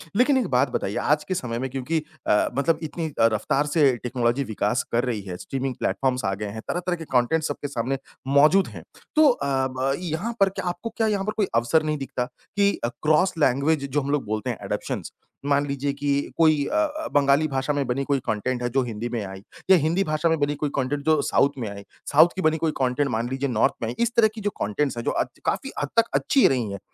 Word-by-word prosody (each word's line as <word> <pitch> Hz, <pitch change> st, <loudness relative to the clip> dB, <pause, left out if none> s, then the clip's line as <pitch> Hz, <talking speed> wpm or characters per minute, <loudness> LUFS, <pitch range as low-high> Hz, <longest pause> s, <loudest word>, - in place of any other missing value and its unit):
लेकिन 260 Hz, +5 st, +4 dB
एक 245 Hz, -, 0 dB
बात 125 Hz, -1 st, +2 dB
बताइए 100 Hz, -, -2 dB
आज 150 Hz, +1 st, +1 dB
के 185 Hz, -, -3 dB
समय 120 Hz, -8 st, -3 dB
में 130 Hz, -, -3 dB
क्योंकि 135 Hz, +5 st, -1 dB, 0.3 s
अ, 105 Hz, -, +3 dB
मतलब 155 Hz, +3 st, +2 dB
इतनी 160 Hz, +1 st, -4 dB
रफ्तार 115 Hz, +5 st, +2 dB
से 145 Hz, -4 st, +3 dB
टेक्नोलॉजी 125 Hz, +1 st, 0 dB
विकास 110 Hz, +1 st, -1 dB
कर 120 Hz, +1 st, +2 dB
रही 115 Hz, -5 st, -2 dB
है, 90 Hz, -2 st, -7 dB
स्ट्रीमिंग 135 Hz, +2 st, -4 dB
प्लेटफॉर्म्स 130 Hz, -1 st, 0 dB
आ 95 Hz, -, +1 dB
गए 105 Hz, +2 st, -4 dB
हैं, 110 Hz, +2 st, -7 dB
तरह-तरह 180 Hz, 0 st, -1 dB
के 165 Hz, -, -8 dB
कॉन्टेंट 130 Hz, +6 st, +2 dB
सबके 145 Hz, -1 st, -3 dB
सामने 135 Hz, 0 st, -2 dB, 0.3 s
मौजूद 150 Hz, +8 st, +5 dB
हैं। -, -, -10 dB, 0.3 s
तो 310 Hz, -1 st, +7 dB
अ, 240 Hz, -, 0 dB, 0.2 s
ब 130 Hz, +1 st, -1 dB
यहाँ 180 Hz, +7 st, -3 dB
पर 195 Hz, -1 st, +5 dB
क्या 190 Hz, -, -6 dB
आपको 175 Hz, +6 st, -5 dB
क्या 225 Hz, -, +2 dB
यहाँ 200 Hz, -2 st, 0 dB
पर 215 Hz, -, -1 dB
कोई 205 Hz, -, +2 dB
अवसर 120 Hz, +7 st, +3 dB
नहीं 155 Hz, -1 st, -1 dB
दिखता 130 Hz, -2 st, -3 dB, 0.3 s
कि 200 Hz, 0 st, +4 dB
क्रॉस 155 Hz, +9 st, +1 dB
लैंग्वेज 140 Hz, +1 st, +2 dB
जो 145 Hz, +3 st, 0 dB
हम 140 Hz, -, -4 dB
लोग 145 Hz, -2 st, 0 dB
बोलते 110 Hz, 0 st, -2 dB
हैं -, -, -2 dB
अडॉप्शंस। -, -, -4 dB, 0.3 s
मान 145 Hz, 0 st, +2 dB
लीजिए 140 Hz, 0 st, -1 dB
कि 145 Hz, +1 st, -5 dB, 0.2 s
अ -, -, -9 dB
अ, -, -, -15 dB
कोई 155 Hz, -3 st, +4 dB, 0.5 s
बंगाली 145 Hz, +2 st, +4 dB
भाषा 135 Hz, +1 st, -1 dB
में 140 Hz, -1 st, 0 dB
बनी 130 Hz, +3 st, -1 dB
कोई 140 Hz, -1 st, +1 dB
कॉन्टेंट 120 Hz, +4 st, -1 dB
है 120 Hz, -, 0 dB
जो 135 Hz, +2 st, +1 dB
हिंदी 115 Hz, 0 st, -4 dB
में 115 Hz, -3 st, -3 dB
आई 95 Hz, 0 st, -8 dB, 0.3 s
या 190 Hz, -, +8 dB
हिंदी 165 Hz, +5 st, +1 dB
भाषा 155 Hz, -1 st, 0 dB
में 160 Hz, -, +2 dB
बनी 145 Hz, 0 st, 0 dB
कोई 145 Hz, 0 st, -2 dB
कॉन्टेंट 140 Hz, +2 st, -1 dB
जो 155 Hz, -2 st, +3 dB
साउथ 140 Hz, -, +3 dB
में 120 Hz, -4 st, -3 dB
आई, 100 Hz, 0 st, -8 dB, 0.3 s
साउथ 155 Hz, +4 st, +7 dB
की 190 Hz, -, -2 dB
बनी 155 Hz, -2 st, +2 dB
कोई 160 Hz, -1 st, 0 dB
कॉन्टेंट 135 Hz, +2 st, +1 dB
मान 115 Hz, +2 st, -1 dB
लीजिए 135 Hz, +1 st, -2 dB
नॉर्थ 115 Hz, -3 st, +2 dB
में 115 Hz, -, -1 dB
आई, 120 Hz, -, -5 dB
इस 235 Hz, 0 st, +2 dB
तरह 230 Hz, -2 st, +6 dB
की 220 Hz, -, -7 dB
जो 205 Hz, -, 0 dB
कॉन्टेंट्स 120 Hz, +5 st, -1 dB
हैं 120 Hz, -, -3 dB
जो -, -, 0 dB
अ, -, -, +1 dB, 0.2 s
काफ़ी -, -, -1 dB
हद 145 Hz, -, -2 dB
तक 230 Hz, -, +6 dB
अच्छी 275 Hz, -, +4 dB
रही 120 Hz, -6 st, 0 dB
हैं। 100 Hz, -, -5 dB
140 Hz, 235 wpm, -24 LUFS, 125-160 Hz, 0.5 s, या